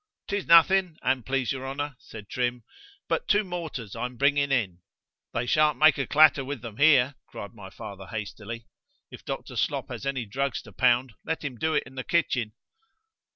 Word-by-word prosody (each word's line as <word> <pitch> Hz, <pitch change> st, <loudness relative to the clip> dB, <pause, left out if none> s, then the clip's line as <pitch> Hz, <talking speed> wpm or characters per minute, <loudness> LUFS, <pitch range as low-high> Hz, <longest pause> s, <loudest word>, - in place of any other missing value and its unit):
——'Tis 200 Hz, -1 st, -2 dB
nothing, 170 Hz, +1 st, +5 dB
an 130 Hz, -1 st, +1 dB
please 135 Hz, +1 st, -1 dB
your 135 Hz, -1 st, -4 dB
honour, 145 Hz, +1 st, -4 dB
said 105 Hz, -2 st, -11 dB
Trim, 125 Hz, 0 st, -2 dB, 0.4 s
but -, -, -1 dB
two 205 Hz, +1 st, +4 dB
mortars 165 Hz, -, -6 dB
I -, -, -2 dB
am 125 Hz, -1 st, -14 dB
bringing 140 Hz, +1 st, +2 dB
in.—They 105 Hz, +1 st, -4 dB
shan't 150 Hz, +2 st, +3 dB
make 155 Hz, 0 st, +5 dB
a 135 Hz, -, -1 dB
clatter 150 Hz, -2 st, +5 dB
with 135 Hz, -2 st, -5 dB
them 115 Hz, -3 st, -8 dB
here, 145 Hz, -2 st, +5 dB
cried 100 Hz, -, -8 dB
my 100 Hz, -4 st, -11 dB
father 100 Hz, -3 st, -9 dB
hastily.—If 110 Hz, +1 st, -9 dB
Dr. -, -, -6 dB
Slop -, -, -1 dB
has 140 Hz, -, -6 dB
any 130 Hz, -3 st, -2 dB
drugs 135 Hz, +6 st, -2 dB
to -, -, -13 dB
pound, 125 Hz, -1 st, +2 dB
let 160 Hz, -1 st, -3 dB
him 135 Hz, -3 st, -4 dB
do 160 Hz, +6 st, 0 dB
it -, -, +2 dB
in -, -, -13 dB
the 130 Hz, -1 st, -5 dB
kitchen. 125 Hz, -10 st, 0 dB
130 Hz, 180 wpm, -27 LUFS, 115-150 Hz, 0.4 s, nothing